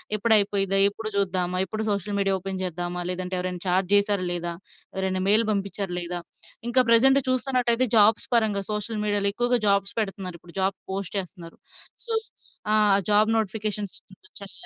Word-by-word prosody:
ఎప్పుడు 220 +2 +2
అయిపోయిందా 195 -1 +2
ఎప్పుడు 215 +2 -5
జూద్దామా, 185 -2 0
ఎప్పుడు 215 +3 -4
సోషల్ 200 0 -2
మీడియా 195 -1 +1
ఓపెన్ 190 0 -5
చేద్దామా, 175 0 -3
లేదంటే 185 0 -3
ఎవరైనా 180 -1 -4
చాట్ 180 +1 +1
జేసారా 200 -2 +3
లేదా, 175 0 -3 0.4
ఎవరైనా 190 -1 -1
మెయిల్ 220 +3 +5
పంపించారా 200 -2 -3
లేదా, 175 0 -4 0.5
ఇంకా 255 +1 +4
ప్రెజెంట్ 265 +4 +6
చూస్తున్నటయితే 255 -1 +1
జాబ్స్ 215 +1 +4
పరంగా, 215 -4 +2
సోషల్ 210 +1 -3
మీడియాలో 205 -1 +1
ఎక్కువగా 245 +2 +1
జాబ్స్ 200 0 +1
పెడుతున్నారు 190 -3 -5
ఇప్పుడు, 170 0 -17
జాబ్స్ 190 +1 -1
పోస్ట్ 195 0 -5
చేస్తున్నారు. 175 -2 -9 0.5
సో, - - -1 0.6
ఆ - - +5 0.4
జాబ్ 215 +2 +4
నోటిఫికేషన్స్ 210 -1 -3 0.3
వచ్చాయ 200 - -6
200 Hz, 150 wpm, -25 LUFS, 185-215 Hz, 0.6 s, ప్రెజెంట్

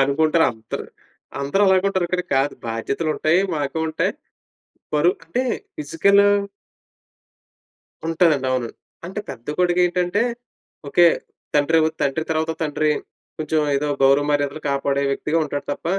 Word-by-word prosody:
అనుకుంటారు 155 +4 +3
అందరూ, 110 0 -7 0.6
అందరూ 145 +9 +1
అలాగే 190 0 +3
ఉంటారంటాగా 180 -1 -1
కాదు 135 +2 +1
బాధ్యతలుంటాయి. 155 +8 0
మాకు 145 +1 -2
ఉంటాయి 155 - 0 0.8
పరు 160 +4 +4
అంటే 240 +11 -1 0.3
ఫిజికలు 200 +7 +3 1.8
ఉంటాదండి 160 -5 +2
అవును. 125 -2 0 0.4
అంటే 195 +3 -5
పెద్ద 120 -3 -12
కొడుకేంటంటే 180 +2 +2 0.7
ఓకే. 175 +3 +6 0.5
తండ్రి 150 +3 +3
వ్ 160 - +2
తండ్రి 140 +3 0
తర్వాత 160 0 0
తండ్రి, 155 0 0 0.5
కొంచెం 155 0 0 0.2
ఏదో 150 +2 0 0.2
గౌరవ 140 +2 +5
మర్యాదలు 145 +1 -1
కాపాడే 140 0 0
వ్యక్తిగా 150 +4 -1
ఉంటాడు 145 -1 -4
తప్ప, - - -6
155 Hz, 115 wpm, -21 LUFS, 140-175 Hz, 1.8 s, ఓకే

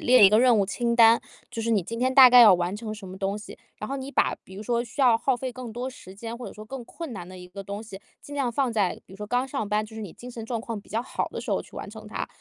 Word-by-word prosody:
列 250 -4 +6
一 - - +10
个 215 - +5
任 245 -1 +5
务 200 - +3
清 235 +4 -1
单。 230 0 +7 0.3
就 225 - -5
是 230 - -1
你 210 -4 +2
今 230 +7 -6
天 260 +1 +1
大 260 -2 +10
概 250 0 +9
要 215 -5 +9
完 175 +2 -1
成 215 0 -5
什 210 -2 -10
么 185 +1 -9
东 195 +1 -1
西， 210 - -10 0.2
然 215 - -6
后 275 - -3
你 265 +1 -6
把 - - +2
比 190 - -13
如 205 - -7
说 235 +1 0
需 245 +4 -7
要 240 -3 +5
耗 260 +1 +1
费 255 0 -5
更 250 -1 -7
多 245 +4 -4
时 190 -6 -13
间， 230 +3 -7
或 245 - -7
者 - - -8
说 215 - -10
更 265 +3 -7
困 320 +2 -8
难 180 -4 -7
的 185 - -10
一 180 - -10
个 195 +2 -9
东 200 +2 -6
西， 195 -3 -10 0.2
尽 285 - -9
量 275 -4 0
放 250 0 0
在 200 -5 +1
比 - - -17
如 - - -11
说 210 +1 -6
刚 245 +4 0
上 220 -5 -3
班， 210 +1 +1
就 220 +1 -13
是 220 - -6
你 205 -5 -6
精 250 - -10
神 230 -2 -8
状 235 0 -2
况 225 -1 -5
比 - - -23
较 225 +3 -1
好 - - -3
的 - - -7
时 - - -6
候， - - +1
去 - - -13
完 - - -6
成 215 0 -11
它。 - - -4
225 Hz, 360 characters per minute, -26 LUFS, 205-245 Hz, 0.3 s, 一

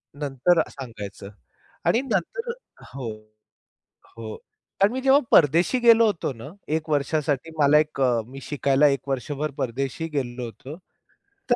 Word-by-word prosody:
नंतर 145 +4 +1
अ, - - 0
सांगायचं, 105 -7 -8 0.6
आणि 235 - +3
नंतर 465 - -2 0.4
हो, 130 -4 -5 1.1
हो. 110 -1 -6 0.4
कारण 200 +3 +4
मी 260 - -3
जेव्हा 270 +2 +5
परदेशी 170 - +4
गेलो 230 -1 +6
होतो 200 -9 -1
ना 115 +5 -10 0.3
1 160 0 -4
वर्षासाठी, 150 0 0
मला 145 +1 +6
एक 155 -3 -2
अ, 120 -3 +3
मी 135 +2 -10
शिकायला 140 0 +2
1 140 -1 -1
वर्षभर 140 +3 -2
परदेशी 135 +6 -3
गेलो 125 -3 -3
होतो. 130 - -9 0.7
तर 245 - +5
145 Hz, 140 wpm, -24 LUFS, 130-165 Hz, 1.1 s, गेलो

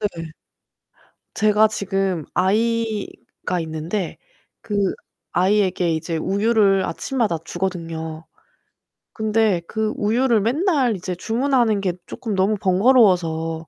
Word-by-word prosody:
네. 165 -1 -7 1.0
제가 215 0 +4
지금 195 -5 -2
아이가 215 -2 -1
있는데 160 +4 -4 0.4
그 210 - -6 0.6
아이에게 185 -3 +2
이제 160 +1 -3
우유를 200 +2 +2
아침마다 230 -11 -1
주거든요. 165 -3 -4 0.9
근데 220 -4 +1
그 220 -1 -2
우유를 230 +2 +2
맨날 265 - +1
이제 180 0 -5
주문하는 235 0 +1
게 185 -3 0
쪼끔 220 -4 -5
너무 195 +3 +2
번거로워서 180 -7 +2
195 Hz, 235 characters per minute, -21 LUFS, 175-220 Hz, 1.0 s, 제가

